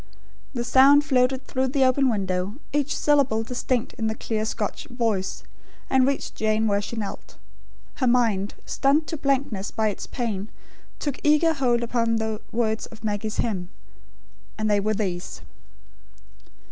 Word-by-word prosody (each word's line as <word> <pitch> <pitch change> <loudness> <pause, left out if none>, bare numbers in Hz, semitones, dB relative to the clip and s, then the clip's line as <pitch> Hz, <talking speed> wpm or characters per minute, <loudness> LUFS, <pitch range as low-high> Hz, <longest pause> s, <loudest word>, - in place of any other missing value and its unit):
The 240 - -1
sound 275 +4 +6
floated 260 -1 +2
through 260 0 0
the 265 +1 +2
open 260 +1 +3
window, 190 -2 -1 0.2
each 290 0 0
syllable 275 -7 +2
distinct 245 0 -2
in 220 - 0
the 220 - -1
clear 220 -1 -2
Scotch 215 -2 -3
voice, 225 -6 -2 0.5
and 265 -1 +4
reached 280 - -2
Jane 215 0 +1
where 200 -1 +2
she 220 - -6
knelt. 210 -3 -6 0.6
Her 260 - +1
mind, 225 -5 +2
stunned 285 +3 +2
to 325 - -2
blankness 270 -8 0
by 220 -1 0
its 205 - -6
pain, 220 -5 -3 0.5
took 285 -3 -3
eager 305 +2 +4
hold 245 -5 +1
upon 230 -1 +1
the 220 -1 -2
words 220 -1 0
of 225 0 -15
Maggie's 210 0 -2
hymn. 185 -6 -1 0.9
And 215 0 -1
they 205 - +4
were 215 +2 0
these. 185 -4 -3
230 Hz, 150 wpm, -24 LUFS, 215-265 Hz, 0.9 s, sound